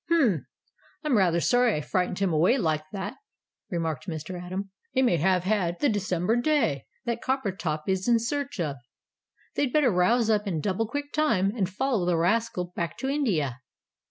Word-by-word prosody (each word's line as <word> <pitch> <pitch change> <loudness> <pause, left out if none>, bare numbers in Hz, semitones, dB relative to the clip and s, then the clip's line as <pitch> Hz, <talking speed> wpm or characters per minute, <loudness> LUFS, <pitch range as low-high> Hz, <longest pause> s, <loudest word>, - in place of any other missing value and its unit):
"H'm! 240 - +3 0.6
I'm 300 -5 +2
rather 175 -5 +3
sorry 245 +4 +3
I 150 - -1
frightened 180 +3 -1
him 195 -4 +1
away 175 - +4
like 160 - +1
that," 205 +4 -5 0.5
remarked 165 -3 -3
Mr. 170 +2 -5
Atom; 190 +2 -5 0.2
"he 260 - +2
may 210 -9 +3
have 180 +2 +2
had 185 -3 0
the 290 - +3
December 205 -1 0
day 240 - +1 0.2
that 235 -1 -2
Coppertop 190 - -2
is 190 +1 0
in 235 -1 +5
search 280 +2 -3
of. 150 -5 -1 0.8
They'd 275 -3 0
better 290 -4 +4
rouse 210 +6 +3
up 210 -1 +2
in 170 -5 -1
double 200 +6 -1
quick 285 +4 -5
time, 210 -11 +2
and 190 -6 0
follow 220 -2 0
the 175 -2 +2
rascal 180 0 0
back 170 -1 -3
to 265 - -2
India." 175 - 0
195 Hz, 175 wpm, -27 LUFS, 175-240 Hz, 0.8 s, in